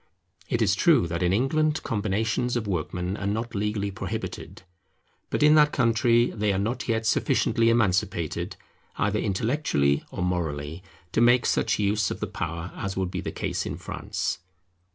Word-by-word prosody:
It 120 -1 +1
is 100 -2 +3
true 140 - +4
that 85 +1 -3
in 90 0 +2
England 150 +8 +1
combinations 110 +2 -1
of 115 - -3
workmen 90 0 -2
are 100 - -3
not 110 +3 -2
legally 100 0 -1
prohibited. 95 0 -6 0.7
But - - 0
in 150 0 +7
that 150 -1 +5
country 120 -1 +3
they 105 -1 0
are 95 - 0
not 115 +6 -2
yet 115 -1 0
sufficiently 115 +1 +2
emancipated 100 -7 0 0.4
either 105 +1 +1
intellectually 95 - +1
or - - -4
morally, 80 -3 -2 0.3
to 110 - +1
make 120 +1 +5
such - - +1
use 105 -1 +1
of - - -5
the - - -1
power 85 +2 -5
as 95 -1 -4
would 95 -2 -1
be - - -3
the - - -4
case - - -2
in - - -4
France. - - -4
105 Hz, 165 wpm, -26 LUFS, 90-115 Hz, 0.7 s, in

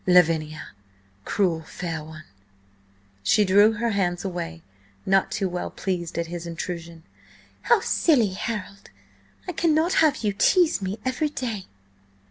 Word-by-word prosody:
"Lavinia! 160 -4 +3 0.6
Cruel 180 -6 +1
fair 160 0 -5
one!" 155 0 -11 1.0
She 205 - +3
drew 205 +3 +5
her 230 +2 -1
hands 180 -3 -1
away, 130 - -5 0.4
not 195 0 +3
too 195 - -1
well 180 0 -4
pleased 175 -4 -4
at 170 - 0
his 170 0 -6
intrusion. 170 -1 -6 0.6
"How 475 - +3
silly, 255 - +3
Harold! 200 0 -5 0.6
I - - -1
cannot 325 +1 +2
have 310 -6 +2
you 205 -2 +1
tease 340 - +3
me 190 +2 -3
every 260 +4 0
day!" 230 -9 -4
190 Hz, 130 wpm, -24 LUFS, 170-225 Hz, 1.0 s, drew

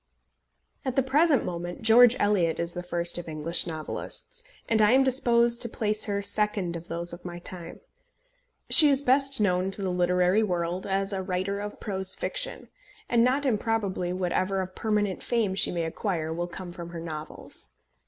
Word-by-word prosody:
At 260 -2 -3
the 270 - +2
present 285 +2 +2
moment 175 +2 -6
George 235 +2 +7
Eliot 195 -6 +1
is 170 0 -3
the 180 - -5
first 175 -1 +4
of 175 - -8
English 160 +3 0
novelists, 165 - -4 0.2
and 220 -1 +3
I 210 +2 +5
am 265 +1 +5
disposed 240 -3 +2
to 235 - -1
place 215 -1 0
her 200 -1 -2
second 200 -4 -1
of 170 +1 -8
those 170 +1 -4
of 175 +1 -10
my 175 -1 -7
time. 175 0 -7 0.9
She 305 -3 +8
is 275 0 +1
best 275 0 +4
known 185 -2 +1
to 195 +1 +1
the 185 - -1
literary 180 +3 +2
world 180 -3 -2
as 195 +1 -1
a 190 - -2
writer 190 +1 -3
of 205 0 -7
prose 190 -2 -2
fiction, - - -4 0.4
and 235 -1 +3
not 265 +4 +1
improbably 210 -6 -1
whatever 185 +1 -1
of 185 0 -7
permanent 210 -3 -1
fame 225 -5 -1
she 190 - +2
may 170 -1 -2
acquire 160 -1 -3
will 175 +1 -3
come 175 +1 -8
from 170 -1 -9
her 170 -1 -7
novels. 155 - -8
190 Hz, 180 wpm, -26 LUFS, 175-225 Hz, 0.9 s, She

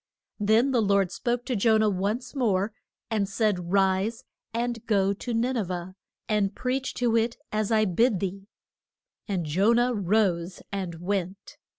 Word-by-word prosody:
Then 220 +6 +3
the 245 -3 +3
Lord 200 -3 +2
spoke 240 +2 -2
to 255 - -1
Jo 220 +1 +4
nah 215 0 +3
once 210 +6 -1
more, 210 -6 +1 0.4
and 205 -3 0
said, 195 -5 0
Rise, 195 +3 +1 0.3
and 235 0 -2
go 200 -2 +2
to 240 +5 -6
Nin 240 +3 0
e 235 - +1
veh, 180 -1 -5 0.3
and 205 -2 +1
preach 260 +1 -2
to 240 -2 +1
it 230 +1 +1
as 215 0 -1
I 215 -1 +4
bid 210 +2 +2
thee. 195 +1 -4 0.8
And 185 -5 -1
Jo 190 +9 +3
nah 240 +1 +3
rose 190 -4 0
and 190 -4 -3
went. 185 +2 -4
210 Hz, 165 wpm, -26 LUFS, 190-230 Hz, 0.8 s, Jo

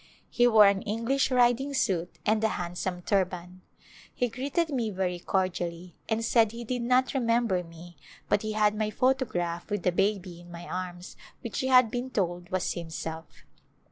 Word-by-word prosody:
He 245 0 +4
wore 220 -3 +7
an 200 -1 +3
English 230 +7 0
riding 250 +2 +2
suit 180 -8 -1
and 215 +1 +2
a - - +5
handsome 180 +1 -4
turban. 180 -2 -1 0.5
He 245 - -1
greeted 280 +8 -1
me 240 -5 -1
very 185 -3 -2
cordially, 175 -2 -2
and 225 0 0
said 225 -2 +3
he 235 +1 -6
did 245 +1 -3
not 250 +2 +3
remem 240 -3 +1
ber 185 -4 +1
me 170 +1 -13 0.3
but 205 - +2
he 215 0 -3
had 210 -1 +2
my 215 0 -1
photograph 210 -9 0
with 205 -4 -3
a 180 - +4
baby 185 -2 -1
in 175 - -15
my 170 0 -8
arms 180 -1 -6 0.2
which 235 -4 -4
he 260 - 0
had 255 -3 +5
been 245 +1 -3
told 175 -6 -2
was 185 -1 -1
himself. 160 -1 -7
205 Hz, 175 wpm, -28 LUFS, 175-240 Hz, 0.5 s, wore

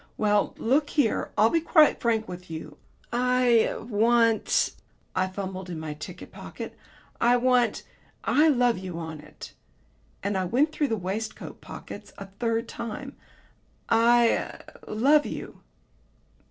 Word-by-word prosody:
"Well, 210 -1 +1
look 285 +5 +1
here, 280 -8 0
I'll 220 +2 +5
be 330 - +2
quite 310 -2 +4
frank 225 -2 +1
with 180 0 -9
you. 160 -1 -8 0.3
I 250 -1 +3
er - - -5
want 230 0 +2 0.2
" - - -39
I 185 0 +1
fumbled 190 -1 -6
in 170 -3 -5
my 155 -1 -5
ticket 150 0 -9
pocket, - - -8 0.5
"I 240 +1 +5
want 245 -2 +2 0.4
'I 305 +2 +4
love 245 -7 +3
you' 185 -3 -6
on 160 -2 -6
it," 150 +1 -12 0.7
and 200 -1 0
I 185 - -1
went 270 - +2
through 300 -1 0
the 225 - -1
waistcoat 200 +4 -5
pockets - - -10
a 200 - -7
third 230 +4 -2
time. 275 +4 -6 0.8
"'I 235 +1 +5
er - - -3 0.2
love 280 +8 +3
you.'" - - -7
225 Hz, 145 wpm, -26 LUFS, 190-250 Hz, 0.8 s, I'll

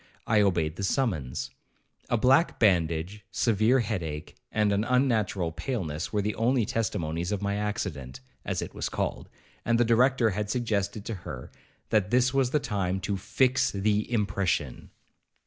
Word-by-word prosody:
I 110 -2 +3
obeyed 85 -5 +1
the 100 - -4
summons. 95 - -1 0.6
A 120 - +2
black 135 +8 +4
bandage, 90 0 +1
severe 115 +5 +2
head 105 -4 -2
ache, 75 -2 -6 0.2
and 105 -1 +2
an 100 +1 +1
unnatural 110 -9 +1
paleness, 85 - -3
were 105 -2 0
the 105 +1 -1
only 120 0 +2
testimonies 90 -6 -2
of 105 -1 -2
my 100 0 0
accident, 70 -11 -3 0.2
as - - -2
it - - -8
was - - -3
called; - - -3 0.3
and 115 0 +2
the 120 - +4
Director 120 0 +3
had 105 +1 -3
suggested 105 -3 -1
to 115 - -3
her 65 -7 -8 0.4
that 105 -2 +2
this 125 +2 +3
was 135 -2 +2
the 150 - +2
time 95 -6 -1
to 100 +2 -1
FIX 130 +6 +2
THE 105 +3 0
IMPRESSION. 95 - -1
105 Hz, 160 wpm, -27 LUFS, 90-115 Hz, 0.6 s, black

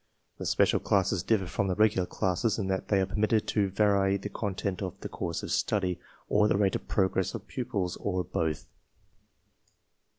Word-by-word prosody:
These - - -2
special - - +3
classes 95 -2 +1
differ 100 0 +1
from 100 +2 -1
the 90 - 0
regular 105 -4 +3
classes 95 +5 0
in 105 - -1
that 95 -1 -1
they 100 -2 +3
are - - +2
permitted 110 +3 +1
to 100 -3 +1
vary 100 0 +2
the 100 +1 -6
content 100 -2 -3
of 95 -4 -5
the - - -5
course 85 -1 -4
of - - -5
study, 90 -3 0 0.3
or 105 0 +3
the 100 - +2
rate 100 -2 +2
of - - -5
progress 95 -2 +1
of - - -7
pupils, 105 -8 -3
or 90 -2 -1
both. 80 -3 -2
95 Hz, 185 wpm, -29 LUFS, 90-105 Hz, 0.3 s, special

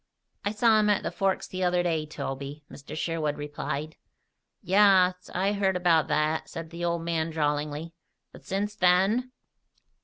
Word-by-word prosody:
"I 200 - 0
saw 220 +1 +4
him 210 0 +2
at 205 - +2
the - - -2
Forks 195 -1 0
the 185 0 -4
other 180 0 +2
day, 160 -3 -1
Toby," 140 0 -6
Mr. 145 +2 -9
Sherwood 155 -3 -1
replied. 150 +1 -5 0.7
"Yaas. 185 -1 +4
I 195 +3 0
heard 195 -2 +1
about 170 -3 +3
that," 155 +1 0
said 165 0 -7
the 170 0 -6
old 170 -1 -1
man 165 -1 -1
drawlingly. 150 +1 -2 0.4
"But - - -14
since 205 +2 -2
then?" 195 +7 +3
170 Hz, 155 wpm, -27 LUFS, 155-190 Hz, 0.7 s, saw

